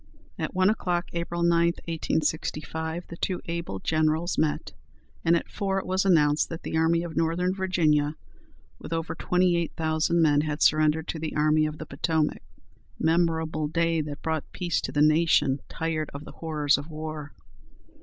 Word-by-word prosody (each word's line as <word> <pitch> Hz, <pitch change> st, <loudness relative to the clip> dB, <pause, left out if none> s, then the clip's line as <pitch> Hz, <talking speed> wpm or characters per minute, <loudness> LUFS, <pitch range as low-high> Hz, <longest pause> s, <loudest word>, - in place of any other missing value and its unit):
At -, -, -3 dB
one 185 Hz, 0 st, +4 dB
o'clock, 180 Hz, -5 st, -1 dB
April 170 Hz, 0 st, -2 dB
9, 170 Hz, 0 st, +4 dB, 0.3 s
1865, 160 Hz, 0 st, -2 dB
the 170 Hz, -, -8 dB
two 185 Hz, 0 st, -2 dB
able 170 Hz, -12 st, -4 dB
generals 155 Hz, -, +1 dB
met, 155 Hz, -1 st, -1 dB, 0.5 s
and 165 Hz, +1 st, +4 dB
at 170 Hz, -, -1 dB
four 195 Hz, -2 st, -2 dB
it 195 Hz, -, -2 dB
was 190 Hz, +1 st, 0 dB
announced 150 Hz, -5 st, +3 dB
that 165 Hz, 0 st, -7 dB
the -, -, -4 dB
Army 165 Hz, +1 st, +2 dB
of 170 Hz, -2 st, -6 dB
Northern 170 Hz, +3 st, +1 dB
Virginia, 160 Hz, -6 st, +1 dB, 0.6 s
with -, -, -9 dB
over 165 Hz, 0 st, -2 dB
twenty 180 Hz, -1 st, +2 dB
eight 170 Hz, -1 st, -1 dB
thousand 160 Hz, +1 st, +1 dB
men, 150 Hz, -3 st, +4 dB
had 150 Hz, 0 st, -1 dB
surrendered 155 Hz, +1 st, +3 dB
to 160 Hz, -, -3 dB
the 155 Hz, 0 st, -4 dB
Army 155 Hz, +1 st, +3 dB
of 155 Hz, 0 st, -6 dB
the 155 Hz, -, -7 dB
Potomac. 155 Hz, +2 st, -1 dB, 0.6 s
Memorable 160 Hz, -2 st, +1 dB
day! 165 Hz, +1 st, +1 dB
that 150 Hz, -1 st, -7 dB
brought 160 Hz, -2 st, -2 dB
peace 175 Hz, -3 st, -1 dB
to -, -, -4 dB
a 145 Hz, -, +5 dB
nation 155 Hz, -3 st, +3 dB
tired 160 Hz, -2 st, -2 dB
of 145 Hz, +2 st, -7 dB
the -, -, -9 dB
horrors 150 Hz, -3 st, +1 dB
of 145 Hz, +3 st, -9 dB
war. 155 Hz, -2 st, -6 dB
160 Hz, 170 wpm, -26 LUFS, 155-170 Hz, 0.6 s, a